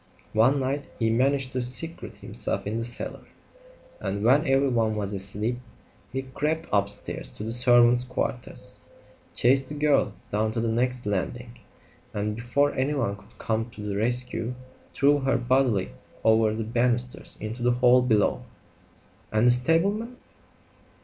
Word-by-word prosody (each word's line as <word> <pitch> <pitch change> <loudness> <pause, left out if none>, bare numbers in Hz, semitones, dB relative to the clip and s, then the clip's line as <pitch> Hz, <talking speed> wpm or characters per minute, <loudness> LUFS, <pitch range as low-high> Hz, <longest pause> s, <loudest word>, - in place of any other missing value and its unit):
One 130 +6 +4
night 135 +2 -2
he 115 -1 +1
managed 130 +2 +1
to 130 - -2
secrete 130 +7 -2
himself - - -3
in 110 +3 -2
the 115 - -3
cellar, 120 0 -4 0.7
and 100 0 -3
when 140 +7 +4
everyone 125 -5 +2
was 105 -1 -3
asleep, 105 +5 -2 0.5
he 135 0 -3
crept 150 +5 -2
upstairs 100 -10 -1
to - - -7
the 110 - -4
servants' 120 0 +5
quarters, 125 -1 -3 0.6
chased 135 +2 +3
the 150 - -6
girl 150 0 +2 0.2
down 110 +1 0
to 115 - -2
the 115 0 0
next 125 +1 -1
landing, 115 +5 -3 0.6
and 105 +1 -2
before 130 +5 +1
anyone 130 -6 -1
could 100 - -20
come 110 +1 -2
to 115 - -11
the 105 -1 -3
rescue 120 +2 +1 0.4
threw 145 +1 +4
her 135 0 +1
bodily 125 -6 +1 0.3
over 110 -1 +4
the 110 +1 -3
banisters 120 +2 -1
into 110 +3 -6
the 120 0 +3
hall 125 0 +5
below." 115 -1 +2 0.9
"And 110 +2 +2
the 125 - +7
stableman 195 - +1
120 Hz, 145 wpm, -26 LUFS, 110-135 Hz, 0.9 s, the